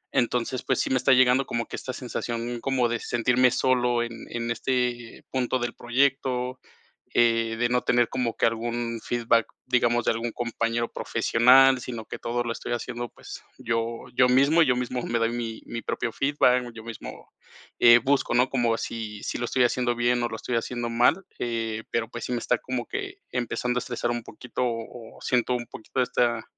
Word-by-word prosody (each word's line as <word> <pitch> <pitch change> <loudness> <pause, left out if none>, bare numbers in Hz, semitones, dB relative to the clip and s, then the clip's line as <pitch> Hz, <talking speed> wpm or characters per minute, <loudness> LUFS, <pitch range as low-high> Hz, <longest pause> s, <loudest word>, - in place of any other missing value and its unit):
Entonces, 125 +1 0
pues - - 0
sí, - - 0
me 130 - +3
está 130 - +4
llegando 130 +1 +5
como 115 0 -2
que - - -6
esta 130 - -5
sensación 120 -1 -4
como 130 -2 +1
de 120 -1 -1
sentirme 125 +2 +2
solo 125 -2 +2
en 115 0 -5 0.2
en 120 0 -3
este 120 -1 -2
punto 130 -1 0
del 120 0 -2
proyecto, 130 0 0 0.6
eh, 115 -1 +3
de 120 +1 +1
no 125 0 +2
tener 120 -1 +3
como 120 -3 -2
que - - +2
algún 115 0 -2
feedback, 115 -1 +2 0.2
digamos, 120 -1 +2
de - - +3
algún 115 +1 -2
compañero 115 0 -2
profesional, 130 +3 +4
sino 115 -2 -6
que - - -7
todo 120 +1 -2
lo 120 - -3
estoy 120 - -4
haciendo, 120 0 -4
pues, - - -11 0.2
yo 115 0 -2
yo 125 0 +5
mismo 140 +6 +5
y - - 0
yo 125 - +3
mismo 125 0 -2
me 120 0 -1
doy 115 0 +1
mi 115 -2 -4
mi 115 - -5
propio 115 - -2
feedback, 125 -2 +2
yo 110 -1 -10
mismo, 115 -1 -9 0.5
eh, 120 0 +8
busco, 135 +1 +1
¿no?, 125 +2 +4
como 120 -3 +1
si 110 -3 -5
si - - -3
lo 120 - -2
estoy 125 +1 +2
haciendo 120 0 +1
bien 120 +1 +1
o 120 - +1
lo 110 - -5
estoy 120 +2 -3
haciendo 120 0 -3
mal, 125 +11 +3 0.2
eh, 115 -2 -2
pero, 115 -1 -1
pues, 120 -1 -6
sí - - -5
me 120 - 0
está 125 - +1
como 130 -2 -4
que 395 0 -5
empezando 125 0 -1
a - - +1
estresar 120 -1 -2
un 120 -1 -3
poquito 125 +3 -5
o 115 0 -6
siento 125 0 +1
un 120 -1 -4
poquito 130 +4 -4
esta 120 -2 +1
120 Hz, 195 wpm, -26 LUFS, 115-125 Hz, 0.6 s, eh